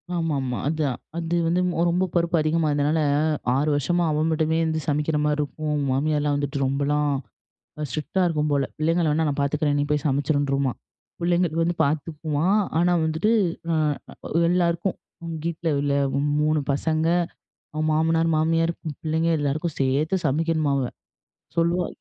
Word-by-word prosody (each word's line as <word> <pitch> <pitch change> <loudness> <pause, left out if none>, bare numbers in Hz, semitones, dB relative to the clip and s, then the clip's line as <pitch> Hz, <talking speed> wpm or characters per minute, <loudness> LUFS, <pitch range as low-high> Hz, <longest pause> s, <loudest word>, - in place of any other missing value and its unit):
ஆமாமா. 140 -7 -1
அதான். 150 -5 -1 0.2
அது 170 0 -1
வந்து 175 +2 +2 0.3
ரொம்ப 180 +2 +1
பொறுப்பு 170 0 +2
அதிகமா 155 +1 +1
இருந்தனால, 145 +2 +1 0.6
6 145 +3 +1
வருஷமா 175 +5 +1
அவ 150 - 0
மட்டுமே 160 0 +1
வந்து 160 0 0
சமைக்கிற 150 +1 0
மாரி 150 0 +1
இருக்கும். 150 0 -2
மாமியார்லாம் 145 +1 +1
வந்துட்டு 145 0 -2
ரொம்பலாம் 145 +2 +1 0.8
ஸ்ட்ரிக்ட்டா 155 +8 -1
இருக்கும் 150 -2 0
போல. 140 -1 +2
பிள்ளைங்க 165 +3 +1
வேணா 160 +2 +1
நான் 145 - -2
பாத்துக்கிறேன். 145 +1 +1
நீ 145 - +1
போய் 150 -1 0
சமைச்சுருன்ருமா. 140 -1 +1 0.5
பிள்ளைங்களுக்கு 170 -1 +1
வந்து 170 0 -1
பாத்துக்குமா, 150 +1 -2 0.3
ஆனா 175 +1 +3
வந்துட்டு, 160 +7 +1 0.4
அ - - +2 0.7
எல்லாருக்கும் 175 +1 +1 0.5
வீட்டில 170 0 -2
உள்ள 140 0 0 0.5
3 155 0 +2
பசங்க, 155 +3 0 0.7
அவங் 155 +1 -1
மாமனார், 165 +1 +2
மாமியார், 165 +1 +2 0.3
பிள்ளைங்க 160 +1 0
எல்லாருக்கும் 150 +3 -2
சேர்த்து 140 +7 +1
சமைக்கணுமா 155 +1 +1
அவ. 135 -2 0 0.7
சொல்லுவா, 170 +1 +2
155 Hz, 135 wpm, -24 LUFS, 145-165 Hz, 0.8 s, ஆனா